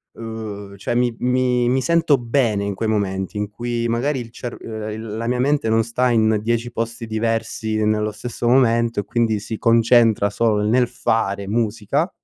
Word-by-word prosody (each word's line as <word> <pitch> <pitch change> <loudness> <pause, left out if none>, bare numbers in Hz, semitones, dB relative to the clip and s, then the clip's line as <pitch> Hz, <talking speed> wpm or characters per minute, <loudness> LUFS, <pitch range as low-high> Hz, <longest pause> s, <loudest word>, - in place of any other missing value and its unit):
ehm, 105 -3 -7
cioè 110 +4 -3
mi 120 0 +2
mi 125 -1 +1
mi 130 +2 +2
sento 165 +1 +3
bene 115 -4 0
in 100 0 -2
quei 110 +3 -3
momenti 95 -2 -1
in 105 0 -2
cui 120 +2 -3
magari 130 +4 0
il 115 - -9
cerv 120 0 -7
il 110 0 -6
la 115 +1 -3
mia 125 +1 0
mente 140 -2 +1
non 110 0 +3
sta 125 +3 0
in 110 -2 +3
10 115 +2 -1
posti 115 0 -4
diversi 110 -1 -1
nello 105 0 0
stesso 120 +2 -4
momento, 115 -3 +3
e - - -11
quindi 115 +1 0
si 110 +1 -5
concentra 115 -2 +4
solo 105 0 +1
nel 120 +3 +3
fare 100 -4 -1
musica 115 - 0
115 Hz, 175 wpm, -21 LUFS, 110-120 Hz, -, concentra